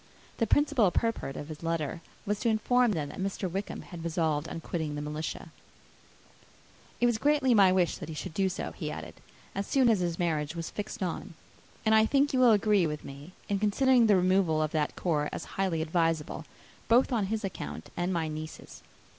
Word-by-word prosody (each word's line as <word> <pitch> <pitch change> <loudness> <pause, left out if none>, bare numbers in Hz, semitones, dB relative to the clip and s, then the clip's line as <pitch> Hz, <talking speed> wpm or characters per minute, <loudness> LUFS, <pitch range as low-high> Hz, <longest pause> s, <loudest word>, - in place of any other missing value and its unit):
The 230 - +2
principal 285 -5 +3
purport 225 -9 -1
of 145 - -6
his 155 -1 -8
letter 165 0 -2 0.2
was 205 0 -1
to 235 - +1
inform 240 +1 +3
them, 150 -5 -2
that - - -9
Mr. 190 0 -2
Wickham 195 +4 -4
had 170 -3 -9
resolved 160 -2 0
on - - -5
quitting 160 -2 -3
the 145 - -4
militia. 150 +1 -5 1.5
"It 240 - +3
was 240 -2 +2
greatly 285 -2 +3
my 195 -4 +6
wish 185 -2 +2
that - - -8
he 160 - -6
should 155 - -6
do 190 +2 +1
so," 185 - -4
he - - -5
added, - - -8 0.3
"as 195 0 -3
soon 260 -3 +4
as 220 -4 +3
his 170 -2 -1
marriage 160 -2 -1
was 165 -1 -5
fixed 210 -1 -5
on. 170 -2 -4 0.5
And 220 - +4
I 220 0 +5
think 280 +2 +2
you 260 - +2
will 250 -2 +7
agree 205 -4 +3
with 150 -1 -5
me, 140 +6 -10
in 200 -1 0
considering 235 +3 +4
a 205 - +6
removal 180 -4 +2
from - - -18
that 150 -2 0
corps 150 -4 0
as - - -5
highly 180 -5 0
advisable, 165 -1 -1 0.4
both 245 +4 +4
on 215 -5 +1
his 220 +1 -2
account 195 - -6
and 175 +2 -1
my 165 -3 0
niece's. 155 0 -8
185 Hz, 200 wpm, -29 LUFS, 160-220 Hz, 1.5 s, will